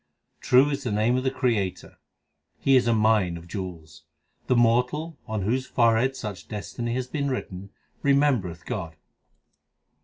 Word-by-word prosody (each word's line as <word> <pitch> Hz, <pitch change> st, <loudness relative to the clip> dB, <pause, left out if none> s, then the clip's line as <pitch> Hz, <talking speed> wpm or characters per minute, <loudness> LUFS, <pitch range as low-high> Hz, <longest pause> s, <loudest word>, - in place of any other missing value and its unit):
True 135 Hz, +4 st, +4 dB
is 140 Hz, -, -3 dB
the 120 Hz, -, -2 dB
name 110 Hz, +4 st, +2 dB
of 130 Hz, -, 0 dB
the 130 Hz, -, +2 dB
Creator; 115 Hz, -9 st, -2 dB, 0.6 s
He 135 Hz, -, +3 dB
is 125 Hz, -2 st, +4 dB
a 115 Hz, -, +4 dB
mine 105 Hz, -5 st, +2 dB
of 85 Hz, +1 st, -12 dB
jewels. 85 Hz, -5 st, -7 dB, 0.4 s
The 125 Hz, -, +3 dB
mortal, 125 Hz, +7 st, +1 dB
on 110 Hz, -3 st, -2 dB
whose 130 Hz, +5 st, -1 dB
forehead 120 Hz, +2 st, +2 dB
such 105 Hz, -7 st, -7 dB
destiny 115 Hz, +3 st, -4 dB
hath 130 Hz, 0 st, -4 dB
been 140 Hz, -2 st, -1 dB
written, 100 Hz, -7 st, -5 dB, 0.3 s
remembereth 135 Hz, -, +1 dB
God. 85 Hz, -6 st, -5 dB
115 Hz, 150 wpm, -25 LUFS, 100-130 Hz, 0.6 s, True